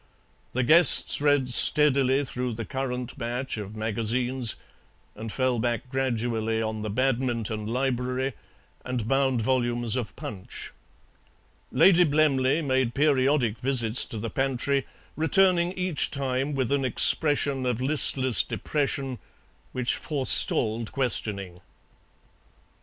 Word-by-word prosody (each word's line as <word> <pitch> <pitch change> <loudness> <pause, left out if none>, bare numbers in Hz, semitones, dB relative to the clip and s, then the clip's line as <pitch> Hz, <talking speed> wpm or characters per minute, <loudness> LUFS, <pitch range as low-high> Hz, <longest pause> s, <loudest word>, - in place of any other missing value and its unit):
The 130 - 0
guests 155 +1 +6
read 145 -3 +2
steadily 140 0 +3
through 125 -1 -4
the 115 0 -6
current 130 0 -5
batch 120 +1 -4
of 105 0 -7
magazines, 115 +3 0 0.6
and 110 +1 -8
fell 130 -1 0
back 120 +2 -2
gradually, 115 -4 -1
on 110 -1 -3
the 110 - -4
"Badminton 115 -3 -1
Library" 130 +2 -2 0.5
and 125 -4 -4
bound 130 -2 +1
volumes 120 -2 0
of 115 -6 -4
PUNCH. 95 -3 -8 1.0
Lady 180 -2 +5
Blemley 145 -1 +1
made 130 -3 0
periodic 135 -5 +1
visits 125 -3 +1
to 115 - -8
the 110 +1 -5
pantry, 135 +2 -1 0.3
returning 175 +1 +3
each 185 -4 -1
time 135 +1 -2
with 130 -2 -1
an 140 -1 +1
expression 140 +1 +1
of 125 -2 -1
listless 130 -2 +3
depression 140 -3 -3 0.5
which 125 -1 -1
forestalled 115 -5 -1
questioning. 100 -8 -2
130 Hz, 115 wpm, -25 LUFS, 115-135 Hz, 1.0 s, guests